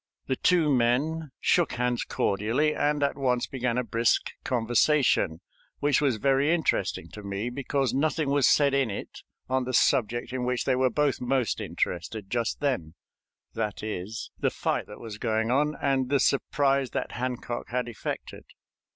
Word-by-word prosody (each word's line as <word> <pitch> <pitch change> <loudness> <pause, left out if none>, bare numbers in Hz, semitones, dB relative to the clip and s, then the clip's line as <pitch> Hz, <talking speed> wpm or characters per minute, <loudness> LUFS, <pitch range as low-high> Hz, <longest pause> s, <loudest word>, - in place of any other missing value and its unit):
The 130 - 0
two 160 -1 +3
men 140 +6 +1
shook 175 -2 +2
hands 125 0 0
cordially, 115 +10 0
and 145 -1 +1
at 140 - +1
once 125 -2 +1
began 125 -2 -2
a 125 - +1
brisk 115 0 +1
conversation, 120 - +2 0.4
which 145 -1 +2
was 135 -6 +2
very 135 +6 +2
interesting 170 -1 0
to 105 - -10
me, 100 +4 -3
because 135 -1 -1
nothing 150 +1 0
was 140 -4 +4
said 140 +4 +4
in 135 -3 +2
it 100 - -7 0.3
on 130 0 0
the 130 0 -1
subject 120 -2 +2
in 130 -1 -2
which 125 0 -1
they 130 - +2
were 130 0 +3
both 145 +3 0
most 125 -1 0
interested 95 +4 -3
just 120 +2 -1
then 115 - -1 0.6
that 105 0 -3
is, 105 +1 -5
the - - +2
fight - - -2
that 105 - -11
was 110 -3 -8
going 110 0 0
on, 150 +3 +2
and 135 -2 +1
the 140 0 +3
surprise 140 0 +2
that - - -3
Hancock 120 -1 -4
had 125 0 -1
effected. 115 -4 -6
125 Hz, 165 wpm, -27 LUFS, 115-140 Hz, 0.6 s, was